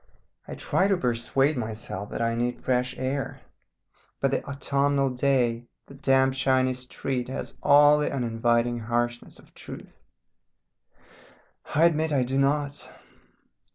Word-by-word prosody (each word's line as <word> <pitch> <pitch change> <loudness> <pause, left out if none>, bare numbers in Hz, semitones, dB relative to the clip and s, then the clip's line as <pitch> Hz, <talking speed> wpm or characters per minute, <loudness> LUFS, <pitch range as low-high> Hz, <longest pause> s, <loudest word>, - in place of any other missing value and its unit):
I - - -6
try 190 - +1
to 195 -2 +2
persuade 135 +2 +1
myself 110 -3 -5
that - - -3
I 115 0 +1
need 120 +1 -2
fresh 125 0 -1
air, 135 +1 -3 0.8
but 135 - +1
the - - -1
autumnal 140 0 0
day, 125 -3 +1 0.2
the - - -14
damp 135 -1 +2
shiny 130 -1 +2
street, 125 0 -4
has 135 - -5
all 145 +1 +6
the 150 - 0
uninviting 120 -1 0
harshness 120 +1 -2
of - - -20
truth - - -11 1.7
I 160 +3 +5
admit 160 -1 +2
I 135 -3 +2
do 130 +2 -1
not. 145 +1 0
130 Hz, 130 wpm, -26 LUFS, 120-140 Hz, 1.7 s, all